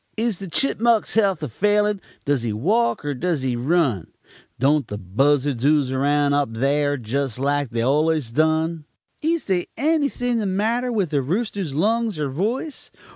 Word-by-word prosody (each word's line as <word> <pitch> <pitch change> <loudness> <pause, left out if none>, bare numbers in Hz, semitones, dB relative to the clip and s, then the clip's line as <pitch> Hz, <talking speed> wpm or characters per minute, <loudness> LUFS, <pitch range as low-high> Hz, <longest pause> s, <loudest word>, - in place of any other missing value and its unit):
Is 225 -4 -1
the 195 - -6
chipmuck's 235 +2 +1
health 195 -7 +2
a - - -1
failin'? 210 - +1 0.2
Does 140 -3 +1
he 115 -2 -2
walk, 195 - 0
er 145 - -1
does 155 0 -2
he 130 -2 0
run? 130 - +1 0.5
Don't 140 +3 +2
the 105 - -5
buzzards 130 +6 +1
ooze 145 -2 +3
around 145 +2 +2
up 140 -5 0
thare 145 +3 +1
jest 130 +1 -3
like 140 0 0
they've 115 0 -2
allus 150 -1 +1
done? 160 +3 +1 0.4
Is 330 +1 0
they 185 -3 0
anything 280 -4 0
the 210 - -1
matter 225 +6 0
with 200 -8 -1
the 145 -2 +1
rooster's 185 - -2
lungs 220 +3 +1
er 150 -2 -2
voice? 225 - -3
155 Hz, 165 wpm, -22 LUFS, 135-210 Hz, 0.5 s, ooze